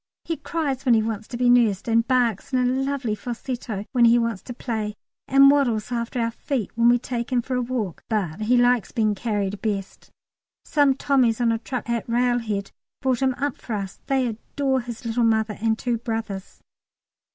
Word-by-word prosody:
He 330 - -1
cries 285 -6 -2
when 250 -4 +4
he 220 - +3
wants 220 -1 -4
to 240 - -6
be 250 0 +2
nursed, 235 -6 +3
and 230 0 +2
barks 245 -5 +1
in 260 - +2
a 250 - +2
lovely 265 -2 0
falsetto 235 -2 -5
when 240 -2 +4
he 235 +1 +6
wants 230 -4 -1
to - - -9
play, 220 -4 -3 0.3
and 275 +1 +7
waddles 245 -6 +1
after 235 +1 -2
our 230 0 0
feet 245 -2 -3
when 235 +1 +4
we 245 - +5
take 240 0 -4
him 245 -2 +2
for 260 - -4
a 250 - +1
walk, 235 -8 -3
but 200 -6 -1
he 240 +4 +3
likes 245 -2 +3
being 215 -2 +1
carried 205 -2 -2
best. 200 -3 -4 0.6
Some 285 -3 +3
Tommies 255 -5 +2
on 235 -1 +3
a 225 - 0
truck 245 0 -5
at 235 0 -2
Railhead 230 -4 0 0.3
brought 260 -2 0
him 260 -1 +2
up 280 0 -2
for 235 - -6
us; 200 -2 -4
they 265 -2 +2
adore 260 +4 -1
his 235 0 -8
little 230 +1 0
mother 220 -2 +2
and 220 -1 +1
two 240 -1 -1
brothers. 225 -4 -5
235 Hz, 195 wpm, -24 LUFS, 220-255 Hz, 0.6 s, and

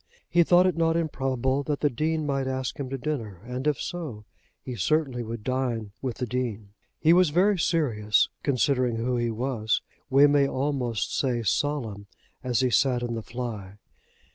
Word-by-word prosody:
He 175 - +4
thought 175 +2 +5
it 185 -3 +2
not 165 0 +2
improbable 135 -4 0
that 145 0 -3
the 145 - +3
Dean 155 +5 -1
might 135 -2 -1
ask 130 0 -3
him 135 -2 -3
to 135 - -3
dinner, 120 - -4
and, 125 +3 -4
if 150 -3 +1
so, 145 -12 -5 0.3
he 125 - -7
certainly 130 - 0
would 115 -1 -6
dine 120 -4 -2
with 130 -3 -3
the 125 - -2
Dean. 115 -4 -3 0.3
He 165 +1 +5
was 180 -2 +5
very 185 +5 +3
serious, 115 -12 +2
considering 130 -3 +1
who 120 +2 -1
he 120 0 0
was, 115 -1 -1 0.3
we 140 +1 +6
may 145 -1 +4
almost 130 -6 -1
say 125 -4 0
solemn, 110 -3 -1 0.4
as 125 -2 +1
he 130 -1 +2
sat 125 -1 +2
in 120 -1 -2
the 115 - -3
fly. 110 -5 -6
130 Hz, 175 wpm, -26 LUFS, 115-145 Hz, 0.4 s, we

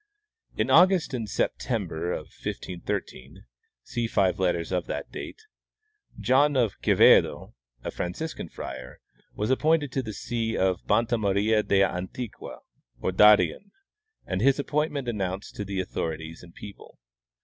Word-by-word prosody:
" 455 - -34
In - - 0
August 185 -5 +5
and 115 -4 -3
September, 85 -2 -2
1513 85 -2 -6 0.4
(see 120 -2 -2
five 95 -3 +1
letters 90 -2 0
of 90 -2 -1
that - - -5
date), 445 - -8 0.8
John 140 +2 +3
of 115 -6 0
Quevedo, - - +4 0.3
a - - -4
Franciscan 95 - -5
friar, 65 -1 -8 0.4
was 105 +4 -1
appointed 150 +1 +2
to 135 - -1
the 110 -4 -6
see 115 +1 -2
of 95 -1 0
Banta 115 +2 +2
Maria 105 +2 +2
del 100 -2 +3
Antiqua, 95 +6 -7 0.4
or - - -1
Darien, 105 - +5 0.6
and 95 0 -2
his 135 +2 +4
appointment 145 -2 -1
announced 95 -4 -3
to 105 - -3
the 100 -1 -4
authorities 80 -3 -4
and 85 -1 -15
people. 105 -1 -12
105 Hz, 135 wpm, -26 LUFS, 90-130 Hz, 0.8 s, August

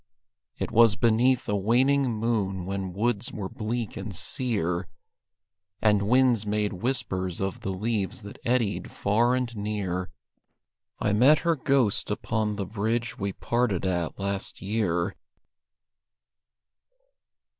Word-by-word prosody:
It - - -3
was 115 -2 +6
beneath 120 +3 +3
a 105 - +1
waning 125 +6 +3
moon 105 -5 -1
when 95 -1 -3
woods 110 +3 -1
were 100 -3 -4
bleak 115 0 -3
and 100 -1 -6
sear, 90 -6 -1 0.9
And 105 -2 +3
winds 125 -3 +4
made 105 -1 -1
whispers 95 -4 -2
of 95 -1 -2
the - - -4
leaves 105 +1 -2
that 100 - -10
eddied 120 -4 0
far 115 +5 +2
and 125 -2 -2
near, 100 -4 -2 0.9
I 105 - +1
met 135 +8 +5
her 170 -1 +3
ghost 135 -6 +1
upon 105 0 -1
the 100 -1 -3
bridge 115 +4 -2
we 100 0 -1
parted 115 -3 0
at 85 -3 -1
last 100 0 -3
year. 95 -3 -1
105 Hz, 125 wpm, -27 LUFS, 95-120 Hz, 0.9 s, was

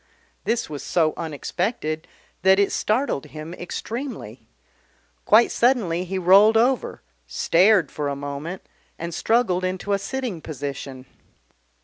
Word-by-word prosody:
This 230 +1 0
was 150 -2 -6
so 160 -3 +1
unexpected 160 - -3 0.3
that 190 +2 +5
it 200 0 +2
startled 220 - 0
him 155 +2 -8
extremely. 235 +9 -6 0.8
Quite 225 +3 +5
suddenly 205 -9 +1
he 190 +1 -3
rolled 195 +5 +6
over, 250 - +1 0.2
stared 185 -1 +3
for 145 -1 -3
a 140 - -2
moment, 145 +6 -6 0.3
and 170 +1 -5
struggled 190 -3 +1
into 185 +2 -2
a 200 - +1
sitting 220 -3 -4
position. 140 -3 -6
185 Hz, 120 wpm, -23 LUFS, 155-220 Hz, 0.8 s, rolled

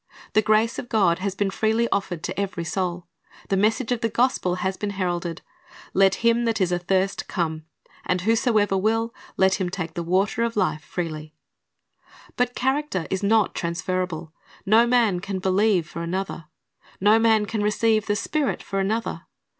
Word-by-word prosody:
The 215 - +5
grace 215 +2 +2
of 240 - -7
God 190 -7 +3
has 195 0 -2
been 195 0 0
freely 220 +3 +1
offered 180 -4 -2
to 185 +2 -4
every 190 -4 -2
soul. 175 +1 -2 0.4
The 195 - +2
message 220 +5 +1
of 245 -1 0
the 230 - +1
gospel 235 -7 +1
has 190 +1 -2
been 205 - -3
heralded, 175 -2 -2 0.5
"Let 195 0 +4
him 235 +1 +3
that 225 -1 0
is 180 -2 +1
athirst 190 +2 0
come. 160 -3 -2 0.4
And 180 -1 0
whosoever 220 -1 +2
will, 225 +4 0 0.2
let 190 +1 +3
him 180 - 0
take 175 -3 -5
the 170 - -3
water 190 +6 +1
of 235 0 0
life 170 -6 0
freely."^ 155 -3 -5 1.0
But 245 0 0
character 265 - -1
is 190 - -1
not 210 0 +3
transferable. 170 -1 -3 0.3
No 225 +4 +5
man 235 -7 +3
can 195 +1 -4
believe 190 -2 +2
for 170 - -7
another. 175 -1 -4 0.5
No 210 +3 +5
man 220 -2 +3
can 220 0 -3
receive 215 +1 +1
the 205 - +1
Spirit 285 +6 -1
for 195 - -3
another. 220 +4 -2
195 Hz, 170 wpm, -24 LUFS, 180-220 Hz, 1.0 s, The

